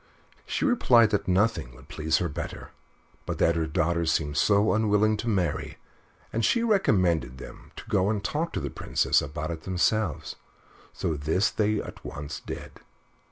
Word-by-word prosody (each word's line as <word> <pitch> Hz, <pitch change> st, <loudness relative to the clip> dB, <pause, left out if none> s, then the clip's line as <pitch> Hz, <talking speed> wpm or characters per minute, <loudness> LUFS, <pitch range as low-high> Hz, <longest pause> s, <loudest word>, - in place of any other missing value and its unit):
She -, -, -1 dB
replied 120 Hz, -, +4 dB
that 105 Hz, -, 0 dB
nothing 95 Hz, -, +1 dB
would 65 Hz, +3 st, -16 dB
please 80 Hz, 0 st, 0 dB
her 85 Hz, -, 0 dB
better, 75 Hz, -, -6 dB, 0.6 s
but -, -, -3 dB
that 85 Hz, -, +3 dB
her 80 Hz, -1 st, 0 dB
daughter 85 Hz, +2 st, 0 dB
seemed 75 Hz, -2 st, 0 dB
so 100 Hz, +7 st, +3 dB
unwilling 110 Hz, 0 st, +3 dB
to 120 Hz, -, -5 dB
marry, 95 Hz, -8 st, -1 dB, 0.6 s
and 115 Hz, -, 0 dB
she 235 Hz, -, +2 dB
recommended 90 Hz, -, +2 dB
them -, -, -11 dB
to -, -, -9 dB
go 95 Hz, +2 st, +2 dB
and 105 Hz, -2 st, -1 dB
talk 160 Hz, +9 st, -2 dB
to -, -, -1 dB
the -, -, -4 dB
Princess -, -, +1 dB
about 75 Hz, +3 st, -4 dB
it 80 Hz, -1 st, -6 dB
themselves 95 Hz, 0 st, -1 dB, 0.5 s
so 80 Hz, -, -2 dB
this 80 Hz, +7 st, +1 dB
they 105 Hz, 0 st, +1 dB
at -, -, -8 dB
once 70 Hz, 0 st, -6 dB
did. -, -, -8 dB
95 Hz, 165 wpm, -27 LUFS, 80-110 Hz, 0.6 s, replied